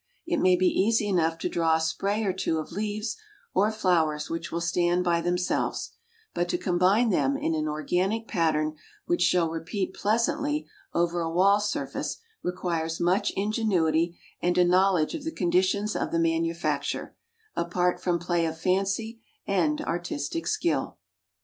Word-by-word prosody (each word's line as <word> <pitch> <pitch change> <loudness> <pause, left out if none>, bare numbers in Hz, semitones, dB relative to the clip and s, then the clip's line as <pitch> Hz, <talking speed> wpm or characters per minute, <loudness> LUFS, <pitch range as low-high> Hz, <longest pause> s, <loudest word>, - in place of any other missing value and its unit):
It 340 -2 0
may 185 0 +5
be 185 +1 +1
easy 215 +3 +2
enough 165 -4 +1
to - - -2
draw 165 -1 +2
a - - +1
spray 200 +6 -1
or 195 -3 0
two 175 -3 -1
of 155 - -5
leaves 210 +3 -3 0.4
or 205 +3 +3
flowers 165 -8 +1
which 165 - -4
will 170 - -1
stand 175 +1 +1
by 170 -1 +2
themselves, 175 +1 -1 0.4
but 175 0 -1
to - - +1
combine 190 +6 +2
them 275 +8 +2
in 220 - -1
an 155 -1 -1
organic 185 +9 -1
pattern 155 -2 +1 0.3
which 345 0 0
shall 170 -3 +3
repeat 180 +4 -3
pleasantly 235 +8 0 0.3
over 175 0 0
a 165 - -1
wall 195 +5 +4
surface 210 0 -3 0.2
requires 170 -2 -2
much 180 +4 +2
ingenuity 175 -6 +1 0.2
and 175 +1 +1
a 180 - +6
knowledge 180 -2 +3
of 315 - -5
the 320 - -3
conditions 190 - +1
of - - -2
the 170 - +1
manufacture, 165 -3 -1 0.4
apart 175 +1 0
from 175 -1 +1
play 170 -1 0
of 160 0 -4
fancy 195 +5 0 0.2
and 165 -6 +1
artistic 165 -2 -3
skill. 135 - 0
175 Hz, 155 wpm, -27 LUFS, 165-200 Hz, 0.4 s, a